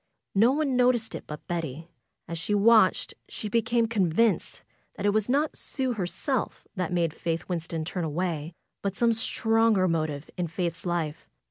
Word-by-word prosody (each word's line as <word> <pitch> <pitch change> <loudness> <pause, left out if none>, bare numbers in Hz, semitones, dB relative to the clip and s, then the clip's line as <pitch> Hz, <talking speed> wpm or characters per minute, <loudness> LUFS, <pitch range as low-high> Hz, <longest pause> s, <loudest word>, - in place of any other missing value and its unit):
No 225 +5 +5
one 285 -2 +1
noticed 245 -2 +2
it - - -7
but 150 -1 -8
Betty. 165 -2 -4 0.4
As 170 0 -4
she 205 +5 0
watched 215 -2 +4 0.2
she 215 - -5
became 230 +1 +2
convinced 210 0 +1 0.3
that 200 - -4
it 205 - +4
was 215 +2 0
not 290 +4 +1
Sue 260 -2 -2
herself 210 - -2
that 180 -3 -2
made 170 -3 +1
Faith 165 0 -3
Winston 165 -2 -3
turn 180 +1 -3
away; 160 0 -2 0.3
but 200 -1 -2
some 235 +1 +3
stronger 225 -3 +2
motive 155 -3 -1
in 175 -1 -1
Faith's 170 +1 -3
life. 165 -3 -2
185 Hz, 160 wpm, -27 LUFS, 165-230 Hz, 0.4 s, No